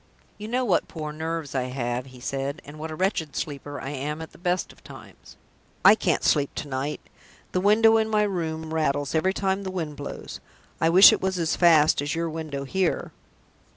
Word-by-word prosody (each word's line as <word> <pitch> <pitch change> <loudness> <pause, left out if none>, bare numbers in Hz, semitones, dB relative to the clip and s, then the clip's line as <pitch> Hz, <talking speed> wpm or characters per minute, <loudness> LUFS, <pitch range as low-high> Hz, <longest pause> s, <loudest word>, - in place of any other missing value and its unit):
"You 210 - -6
know 250 +3 0
what 185 -7 +1
poor 155 -2 -6
nerves 160 -2 -4
I 130 -2 -1
have," 125 0 -3
he 130 -1 -14
said, 135 +4 -3
"and 150 +2 -11
what 160 +1 -5
a 155 - -6
wretched 175 -4 -1
sleeper 145 -1 -5
I 135 - -5
am 145 +2 -4
at 160 - -8
the - - -18
best 180 0 -1
of - - -24
times. - - -14 0.5
I - - +10
can't - - 0
sleep 145 -2 +2
to 150 - -5
night. 135 +2 -3 0.5
The 185 - 0
window 220 +3 +5
in 220 0 +1
my 215 -1 +2
room 160 -5 -3
rattles 145 -3 0
every 185 +4 +1
time 195 0 0
the 190 - -5
wind 165 -5 -4
blows. 145 - -7 0.4
I 165 - +4
wish 185 +4 +9
it - - -2
was 190 -1 -1
as 165 -2 0
fast 155 -4 +5
as 145 +2 -2
your 165 0 -2
window 155 -3 -5
here." 185 +5 -1
160 Hz, 205 wpm, -25 LUFS, 145-185 Hz, 0.5 s, I